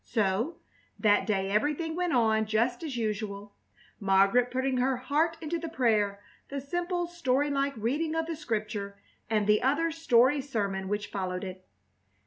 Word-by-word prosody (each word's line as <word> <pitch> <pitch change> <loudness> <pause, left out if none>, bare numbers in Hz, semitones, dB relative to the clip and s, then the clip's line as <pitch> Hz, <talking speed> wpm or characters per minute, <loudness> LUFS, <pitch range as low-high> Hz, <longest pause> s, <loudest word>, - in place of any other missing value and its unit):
So, 225 - 0 0.4
that 205 -2 +3
day 195 -2 0
everything 300 +9 0
went 355 -1 0
on 220 -3 +3
just 230 +3 +1
as 295 -7 -4
usual, 210 -2 -3 0.5
Margaret 200 +5 +4
putting 260 0 0
her 255 +1 +1
heart 300 +6 0
into 330 +1 -2
the 330 0 -5
prayer, 210 -8 +1 0.3
the 280 - -3
simple, 350 +5 -2
storylike 280 -4 0
reading 295 +9 -1
of 325 0 0
the 330 0 -4
Scripture, 215 -7 -3 0.3
and 215 -2 +2
the 210 0 +4
other 295 +6 +2
story 280 -3 +3
sermon 200 -8 -2
which 205 +1 -3
followed 185 -1 -3
it. 185 -1 -7
245 Hz, 150 wpm, -29 LUFS, 205-295 Hz, 0.5 s, Margaret